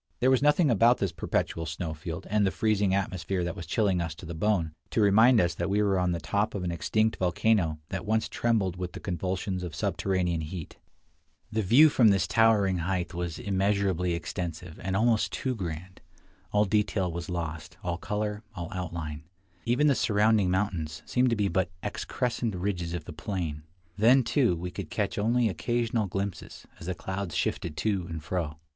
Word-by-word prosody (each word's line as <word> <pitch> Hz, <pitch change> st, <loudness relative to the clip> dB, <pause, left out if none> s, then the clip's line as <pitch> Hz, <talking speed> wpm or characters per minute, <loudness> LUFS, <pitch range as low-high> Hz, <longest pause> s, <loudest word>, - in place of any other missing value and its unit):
There 130 Hz, +1 st, +4 dB
was 130 Hz, -, +4 dB
nothing 150 Hz, 0 st, +4 dB
about 115 Hz, +3 st, +5 dB
this 100 Hz, -, -1 dB
perpetual 80 Hz, -1 st, -2 dB
snow 80 Hz, +1 st, -4 dB
field, 85 Hz, +4 st, -6 dB
and 105 Hz, -1 st, +3 dB
the 95 Hz, -, +3 dB
freezing 105 Hz, -1 st, +1 dB
atmosphere 95 Hz, -1 st, -1 dB
that 85 Hz, +2 st, -3 dB
was 85 Hz, -5 st, -7 dB
chilling 95 Hz, -1 st, +1 dB
us 80 Hz, -2 st, -3 dB
to 85 Hz, -, -11 dB
the 85 Hz, -, -6 dB
bone, 85 Hz, -2 st, 0 dB, 0.2 s
to -, -, -1 dB
remind 110 Hz, +4 st, +6 dB
us 85 Hz, -2 st, +2 dB
that 85 Hz, -, -2 dB
we 100 Hz, +1 st, +2 dB
were 100 Hz, -2 st, +2 dB
on 90 Hz, -1 st, +1 dB
the 85 Hz, -, -1 dB
top 100 Hz, +8 st, -1 dB
of 95 Hz, -, -3 dB
an 90 Hz, -, -1 dB
extinct 110 Hz, +6 st, +1 dB
volcano 90 Hz, -2 st, +2 dB
that 95 Hz, -2 st, -3 dB
once 110 Hz, +1 st, +1 dB
trembled 105 Hz, -6 st, 0 dB
with 90 Hz, -1 st, -4 dB
the -, -, -7 dB
convulsions 95 Hz, +1 st, -2 dB
of 85 Hz, -4 st, -5 dB
subterranean 90 Hz, -3 st, 0 dB
heat. 80 Hz, +1 st, -7 dB, 0.7 s
The 110 Hz, 0 st, 0 dB
view 120 Hz, +11 st, +7 dB
from 130 Hz, -6 st, +4 dB
this 95 Hz, -4 st, +4 dB
towering 105 Hz, -5 st, +3 dB
height 90 Hz, +1 st, -2 dB
was 85 Hz, -2 st, -3 dB
immeasurably 95 Hz, -3 st, 0 dB
extensive, 85 Hz, 0 st, -5 dB
and 95 Hz, 0 st, -2 dB
almost 115 Hz, 0 st, +2 dB
too 130 Hz, -, -2 dB
grand. 90 Hz, -3 st, -6 dB, 0.5 s
All 105 Hz, 0 st, +3 dB
detail 100 Hz, -3 st, +1 dB
was 85 Hz, +2 st, -5 dB
lost 80 Hz, -2 st, -5 dB
— -, -, -29 dB
all 85 Hz, -1 st, -2 dB
color, 105 Hz, 0 st, -2 dB
all 85 Hz, -2 st, -5 dB
outline; 80 Hz, -4 st, -5 dB, 0.4 s
even 125 Hz, +5 st, +2 dB
the 145 Hz, -, +5 dB
surrounding 105 Hz, -4 st, +3 dB
mountains 85 Hz, -5 st, -1 dB
seemed 125 Hz, 0 st, +2 dB
to 115 Hz, -, +1 dB
be 105 Hz, -2 st, +1 dB
but 95 Hz, 0 st, 0 dB
excrescent 120 Hz, -4 st, -2 dB
ridges 90 Hz, -2 st, -2 dB
of 85 Hz, -, -5 dB
the 85 Hz, -, -8 dB
plain. 75 Hz, -1 st, -4 dB, 0.4 s
Then, 125 Hz, +5 st, +6 dB
too, 120 Hz, -, +2 dB
we 90 Hz, +2 st, -5 dB
could -, -, -6 dB
catch -, -, -2 dB
only 115 Hz, +3 st, +2 dB
occasional 115 Hz, +3 st, 0 dB
glimpses, 95 Hz, 0 st, -5 dB
as 85 Hz, -, -9 dB
the 90 Hz, -, -2 dB
clouds 95 Hz, -2 st, -4 dB
shifted 75 Hz, -3 st, -2 dB
to 100 Hz, -4 st, 0 dB
and 80 Hz, -2 st, -5 dB
fro. 80 Hz, -1 st, -3 dB
95 Hz, 190 wpm, -28 LUFS, 85-105 Hz, 0.7 s, view